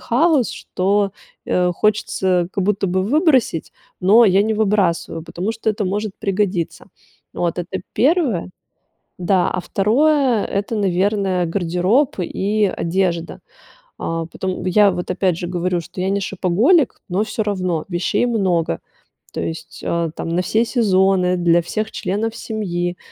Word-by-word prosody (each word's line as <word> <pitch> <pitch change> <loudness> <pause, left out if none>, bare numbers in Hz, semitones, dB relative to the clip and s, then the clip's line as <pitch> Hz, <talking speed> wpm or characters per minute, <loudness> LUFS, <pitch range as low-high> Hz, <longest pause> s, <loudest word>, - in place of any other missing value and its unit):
хаос, 280 0 +2
что, 195 +1 0 0.3
э, 180 0 +2
хочется 185 -3 +1
как 195 - -1
будто 200 -1 0
бы 185 +1 +1
выбросить, 265 - +2 0.3
но 215 +6 +6
я 195 0 +4
не 220 +1 0
выбрасываю, 195 -6 0
потому 180 +6 -4
что 225 -1 -1
это 210 -1 -2
может 205 +2 -2
пригодиться. 195 -4 -1 0.5
Вот 175 0 -1
это 180 +1 -4
1. 265 - +1 0.7
Да, 180 0 +2
а 180 - -2
2- 250 - +2
это, 200 +3 -2
наверное, 195 -2 +1
гардероб 185 - +1
и 205 +4 0
одежда. 170 -1 -1 0.6
А 165 0 -2
потом, 185 +3 -5
я 200 +2 +5
вот 180 0 -4
опять 180 -2 0
же 175 - -4
говорю, 180 0 -1
что 180 - -11
я 190 - 0
не 200 +1 +1
шопоголик, 210 - +2
но 190 +4 +1
всё 220 0 -2
равно 185 -6 -2
вещей 175 +6 0
много. 185 - 0 0.5
То - - -3
есть, 160 - -6
а, 170 -1 0
там - - -4
на 175 +2 +1
все 220 +5 +1
сезоны, 190 -5 +2
для 170 0 +3
всех 215 +6 -3
членов 220 +4 -2
семьи. 180 -6 -3
190 Hz, 145 wpm, -19 LUFS, 175-215 Hz, 0.7 s, но